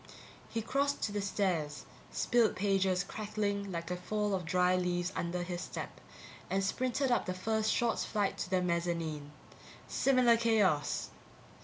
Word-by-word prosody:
_ -, -, -13 dB, 0.4 s
He 225 Hz, -, -2 dB
crossed 280 Hz, +4 st, 0 dB
to 210 Hz, -, 0 dB
the 205 Hz, 0 st, -1 dB
stairs, 180 Hz, -7 st, -1 dB, 0.2 s
spilled 240 Hz, -3 st, +2 dB
pages 190 Hz, -2 st, +2 dB
crackling 200 Hz, -1 st, -2 dB
like 170 Hz, 0 st, -4 dB
a -, -, 0 dB
fall 210 Hz, +3 st, -1 dB
of 185 Hz, -3 st, -1 dB
dry 180 Hz, +2 st, +3 dB
leaves 180 Hz, 0 st, 0 dB
under 175 Hz, +1 st, -2 dB
his 175 Hz, 0 st, -4 dB
step, -, -, -6 dB, 0.5 s
and 195 Hz, 0 st, +1 dB
sprinted 255 Hz, +6 st, 0 dB
up 240 Hz, -, +2 dB
the 185 Hz, -, -2 dB
first 220 Hz, +3 st, 0 dB
short 235 Hz, -1 st, +1 dB
flight 205 Hz, -3 st, 0 dB
to -, -, -3 dB
the 185 Hz, -1 st, +2 dB
mezzanine. 170 Hz, -4 st, -1 dB, 0.6 s
Similar 255 Hz, -3 st, +4 dB
chaos! 210 Hz, -10 st, +2 dB
195 Hz, 155 wpm, -32 LUFS, 180-220 Hz, 0.6 s, Similar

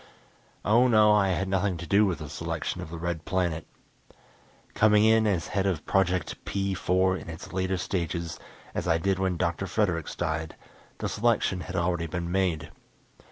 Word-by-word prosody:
Oh, 120 Hz, +4 st, +5 dB
no, 110 Hz, -3 st, +5 dB
I 105 Hz, -2 st, +4 dB
had 95 Hz, +1 st, 0 dB
nothing 95 Hz, -1 st, 0 dB
to 85 Hz, -, -7 dB
do 100 Hz, +5 st, +4 dB
with 90 Hz, -, -1 dB
the 75 Hz, -, -7 dB
selection 75 Hz, -, -4 dB
of -, -, -7 dB
the 85 Hz, -, -6 dB
Red 85 Hz, -1 st, -3 dB
Planet. 85 Hz, -4 st, -1 dB, 1.1 s
Coming 105 Hz, -1 st, +5 dB
in 110 Hz, 0 st, +4 dB
as 90 Hz, -6 st, 0 dB
head 100 Hz, -1 st, 0 dB
of 90 Hz, -6 st, -2 dB
Project 90 Hz, -3 st, 0 dB
P 100 Hz, -1 st, -1 dB
4 95 Hz, +1 st, +2 dB
in -, -, -9 dB
its 90 Hz, +3 st, -9 dB
latter 95 Hz, 0 st, 0 dB
stages, 85 Hz, -3 st, -3 dB, 0.3 s
as -, -, -3 dB
I 80 Hz, -, +3 dB
did 95 Hz, +2 st, 0 dB
when 95 Hz, -2 st, 0 dB
Dr. 85 Hz, +2 st, -1 dB
Fredericks 90 Hz, -4 st, -1 dB
died, 80 Hz, 0 st, -2 dB, 0.4 s
the -, -, -3 dB
selection 110 Hz, -4 st, +1 dB
had 90 Hz, +1 st, -6 dB
already 85 Hz, -1 st, 0 dB
been 85 Hz, +1 st, -4 dB
made. 85 Hz, -5 st, 0 dB
90 Hz, 175 wpm, -27 LUFS, 85-100 Hz, 1.1 s, Oh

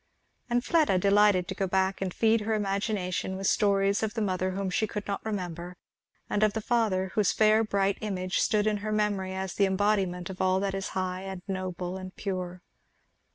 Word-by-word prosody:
And 240 Hz, 0 st, +1 dB
Fleda 310 Hz, -, +3 dB
delighted 200 Hz, -1 st, +4 dB
to 190 Hz, -, -3 dB
go 195 Hz, 0 st, -1 dB
back 190 Hz, +1 st, 0 dB
and 190 Hz, -1 st, -1 dB
feed 225 Hz, +3 st, +2 dB
her 220 Hz, +1 st, 0 dB
imagination 195 Hz, -2 st, -1 dB
with 195 Hz, -, -4 dB
stories 200 Hz, 0 st, +2 dB
of 220 Hz, 0 st, -2 dB
the 225 Hz, -, -1 dB
mother 185 Hz, -1 st, 0 dB
whom 195 Hz, -1 st, -2 dB
she 220 Hz, +4 st, +1 dB
could 210 Hz, 0 st, -5 dB
not 200 Hz, -, -3 dB
remember, 180 Hz, -4 st, -4 dB, 0.5 s
and 205 Hz, -, -1 dB
of 215 Hz, -1 st, +3 dB
the 220 Hz, -, -1 dB
father 210 Hz, -5 st, +1 dB
whose 205 Hz, -1 st, +2 dB
fair 215 Hz, +1 st, +4 dB
bright 200 Hz, -2 st, 0 dB
image 185 Hz, -3 st, -2 dB
stood 210 Hz, -1 st, +2 dB
in 215 Hz, -1 st, +1 dB
her 215 Hz, +1 st, -4 dB
memory 205 Hz, -3 st, 0 dB
as 190 Hz, -1 st, -3 dB
the 200 Hz, -, +3 dB
embodiment 190 Hz, -2 st, 0 dB
of 185 Hz, -, -6 dB
all 185 Hz, 0 st, +3 dB
that 200 Hz, -1 st, -1 dB
is 195 Hz, 0 st, -3 dB
high 185 Hz, 0 st, -2 dB
and 190 Hz, -2 st, -7 dB
noble 185 Hz, -1 st, -3 dB
and 185 Hz, 0 st, -8 dB
pure. 185 Hz, -2 st, -4 dB
195 Hz, 200 wpm, -28 LUFS, 185-210 Hz, 0.5 s, delighted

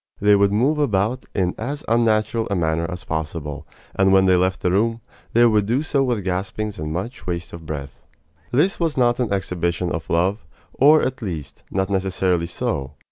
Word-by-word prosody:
They 105 Hz, 0 st, +5 dB
would 100 Hz, 0 st, +3 dB
move 135 Hz, +9 st, +2 dB
about 115 Hz, -2 st, 0 dB
in 90 Hz, -3 st, +1 dB
as 140 Hz, +6 st, -4 dB
unnatural 115 Hz, -1 st, +2 dB
a 100 Hz, -, 0 dB
manner 80 Hz, -1 st, 0 dB
as 90 Hz, -1 st, -6 dB
possible; 80 Hz, -2 st, -4 dB, 0.3 s
and 95 Hz, 0 st, +3 dB
when 95 Hz, 0 st, +5 dB
they 95 Hz, -1 st, +5 dB
left 90 Hz, 0 st, +1 dB
the 90 Hz, -, +1 dB
room, 115 Hz, +4 st, +1 dB, 0.3 s
they 120 Hz, +1 st, +6 dB
would 105 Hz, -3 st, +3 dB
do 125 Hz, +6 st, +1 dB
so 140 Hz, -3 st, +1 dB
with 120 Hz, -6 st, -1 dB
gaspings 100 Hz, +2 st, -3 dB
and 75 Hz, 0 st, -4 dB
much 95 Hz, +3 st, -5 dB
waste 85 Hz, -2 st, -4 dB
of 80 Hz, -2 st, -9 dB
breath. 70 Hz, -3 st, -6 dB, 0.5 s
This 155 Hz, +10 st, +2 dB
was 165 Hz, -4 st, 0 dB
not 120 Hz, -1 st, +3 dB
an 120 Hz, -4 st, 0 dB
exhibition 90 Hz, -3 st, -1 dB
of 80 Hz, -, -4 dB
love 95 Hz, +5 st, +1 dB, 0.3 s
or, 150 Hz, +3 st, +5 dB
at 130 Hz, 0 st, -2 dB
least, 85 Hz, -9 st, -6 dB
not 95 Hz, +1 st, -1 dB
necessarily 95 Hz, -3 st, 0 dB
so. 80 Hz, -, -3 dB
95 Hz, 190 wpm, -22 LUFS, 85-115 Hz, 0.5 s, they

